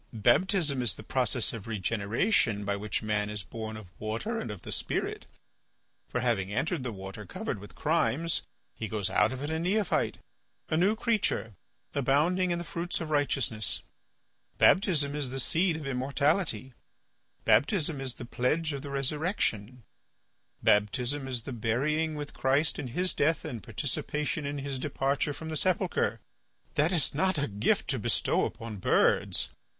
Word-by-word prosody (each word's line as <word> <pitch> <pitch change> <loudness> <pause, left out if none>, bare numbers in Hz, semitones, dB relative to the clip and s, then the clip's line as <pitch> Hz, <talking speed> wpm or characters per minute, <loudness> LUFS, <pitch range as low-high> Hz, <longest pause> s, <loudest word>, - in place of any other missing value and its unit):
Baptism 140 - +3
is 115 -6 +1
the - - -10
process - - +1
of 115 -3 -7
regeneration 110 - +1
by 100 0 0
which 105 +2 -2
man 105 -1 0
is 105 -2 -4
born 110 +2 -6
of 110 - -9
water 115 - -2
and - - -4
of 105 -4 -7
the - - -7
spirit, - - -2 0.8
for - - -1
having 105 -6 +1
entered 145 - 0
the 125 - -2
water 95 +1 -7
covered 100 +2 -4
with 105 +1 -12
crimes, 165 0 +1 0.3
he 110 - -4
goes 105 -1 -2
out - - +4
of 130 +1 -5
it 145 - -2
a 160 - 0
neophyte, 200 +5 +1 0.5
a - - +1
new 190 +6 +4
creature, 220 - 0 0.4
abounding 150 +7 +2
in 175 - +1
the 170 - -3
fruits 170 +1 -3
of 160 -2 -4
righteousness; 135 -7 +1 0.7
baptism 150 -7 +4
is 145 -3 -1
the 135 +1 -3
seed 170 +5 +2
of 155 - -7
immortality; 135 - 0 0.7
baptism 145 - +3
is 130 -2 -2
the 120 - -7
pledge 150 +6 0
of 140 - -4
the 140 - -7
resurrection; 135 - -1 0.8
baptism 125 +7 +2
is 125 -3 -2
the 130 - -5
burying 145 +8 0
with 145 -1 -5
Christ 140 +4 +1
in 130 - -3
His 180 +10 0
death 160 +3 +1
and 125 -8 -5
participation 150 - -2
in 145 0 -3
His 140 -1 -3
departure 140 0 0
from 160 +2 -6
the 160 - -3
sepulchre. 185 +3 +1 0.5
That 155 +4 +3
is 165 -6 +2
not 185 +4 +2
a 140 - +1
gift 100 0 +1
to - - -1
bestow - - +2
upon 115 -2 -6
birds. 95 - +2
135 Hz, 160 wpm, -29 LUFS, 110-160 Hz, 0.8 s, out